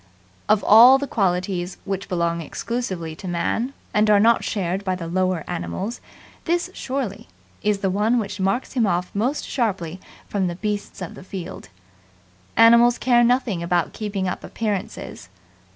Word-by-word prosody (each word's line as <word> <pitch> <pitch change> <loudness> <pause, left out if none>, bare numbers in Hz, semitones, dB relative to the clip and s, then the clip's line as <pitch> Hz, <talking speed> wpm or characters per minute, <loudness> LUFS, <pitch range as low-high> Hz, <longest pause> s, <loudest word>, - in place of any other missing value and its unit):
Of 210 -1 +4
all 240 +5 +8
the 280 - -3
qualities 180 -5 -1
which 195 -1 -4
belong 170 -1 0
exclusively 180 -3 -4
to 190 - -8
Man 200 +8 -1 0.2
and 210 0 +3
are 205 -1 +6
not 230 +2 +4
shared 190 -1 -2
by 185 -2 -1
the 175 -2 -6
lower 185 -1 0
animals, 85 - -4 0.4
this 350 +2 0
surely 255 -7 -4 0.3
is 205 -1 0
the 195 - +1
one 215 +5 +2
which 205 -3 -3
marks 195 +6 -1
him 240 -5 +2
off 180 0 -1
most 245 +9 -1
sharply 190 - -2 0.3
from 195 -3 -1
the 175 - -3
beasts 205 -1 -4
of 175 - -7
the - - -11
field. 180 - -8 0.9
Animals 235 +1 +6
care 240 -2 +4
nothing 240 -7 +1
about 170 0 0
keeping 200 -3 -3
up 180 - -4
appearances. 205 - -4
200 Hz, 155 wpm, -22 LUFS, 180-230 Hz, 0.9 s, all